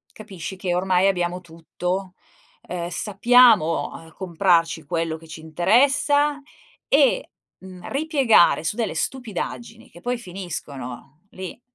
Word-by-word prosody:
Capisci 190 -4 -8
che 185 -2 -2
ormai 185 +1 +2
abbiamo 180 -2 0
tutto? 180 +2 -5 0.5
Ehm, 170 -1 -5
sappiamo, 210 -2 +4
uhm, 160 0 -12
comprarci 170 -3 +1
quello 165 +1 -2
che 165 0 -15
ci 160 0 -9
interessa 280 - +2 0.5
e, - - +3 0.3
mhmm, 185 -1 -11
ripiegare 270 - +3
su 205 - -2
delle 235 -2 -2
stupidaggini 230 -1 -5
che 175 - -15
poi 245 +6 -2
finiscono 155 - -8
lì, 185 +4 -8
185 Hz, 115 wpm, -23 LUFS, 165-230 Hz, 0.5 s, sappiamo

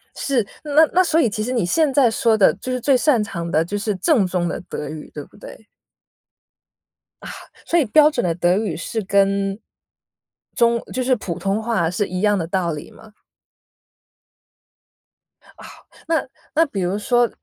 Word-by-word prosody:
是， 255 -6 0 0.2
那 300 - -7 0.2
那 370 - +5
所 325 -2 +1
以 250 - +3
其 215 +1 -3
实 245 - -3
你 235 -7 0
现 300 - +2
在 265 -4 +4
说 225 -1 +1
的 190 -7 +5
就 255 +7 -6
是 255 - -1
最 270 +2 +2
擅 255 -2 +2
长 170 -4 -5
的 160 - +2
就 205 +4 -4
是 210 +1 -2
正 215 - +2
宗 180 -1 -1
的 - - -4
德 150 - -5
语 155 0 -8
对 150 - -7
不 - - -23
对？ 215 - -12 1.6
啊， - - -8 0.4
所 345 - +2
以 300 - +2
标 300 +7 +5
准 275 -5 -2
的 175 -2 0
德 175 +1 +2
语 205 -6 -2
是 195 +7 -4
跟 195 0 +1 1.0
中 235 0 +3
就 255 - -1
是 255 0 +2
普 180 -7 -5
通 195 +2 -1
话 220 -8 0
是 195 +3 -2
一 185 0 -4
样 205 -1 +2
的 170 - -2
道 180 -1 -1
理 150 -1 -8
吗？ 220 -1 -17 2.3
哦。 - - -19 0.5
那 320 -4 0 0.3
那 325 +2 +4
比 200 -8 -4
如 180 +3 -1
说， 240 +2 +2
210 Hz, 195 characters per minute, -20 LUFS, 185-255 Hz, 2.3 s, 那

